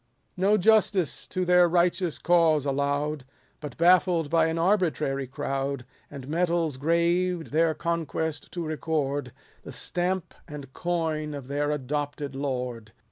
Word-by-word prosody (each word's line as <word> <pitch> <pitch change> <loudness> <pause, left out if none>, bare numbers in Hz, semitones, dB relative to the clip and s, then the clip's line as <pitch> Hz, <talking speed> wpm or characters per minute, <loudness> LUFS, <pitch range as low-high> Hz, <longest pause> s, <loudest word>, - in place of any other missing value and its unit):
No 195 +3 +3
justice 205 -4 +2
to 185 0 -2
their 180 -1 +5
righteous 175 0 +1
cause 165 -4 +3
allow'd; 145 +1 -1 0.4
But 150 -4 -8
baffled 170 -2 +3
by 165 -1 +4
an 160 0 -2
arbitrary 165 -7 +1
crowd. 135 0 -3 0.2
And 135 -3 -9
medals 165 -2 0
graved 170 +3 +1
their 160 +1 +2
conquest 160 -2 -3
to 175 -2 -3
record, 145 -4 -2 0.3
The - - -10
stamp 180 0 -2
and 145 -4 -9
coin 160 -4 -2
of 140 -3 -8
their 145 +1 -1
adopted 145 0 -3
lord. 125 -5 -4
160 Hz, 130 wpm, -26 LUFS, 140-175 Hz, 0.4 s, their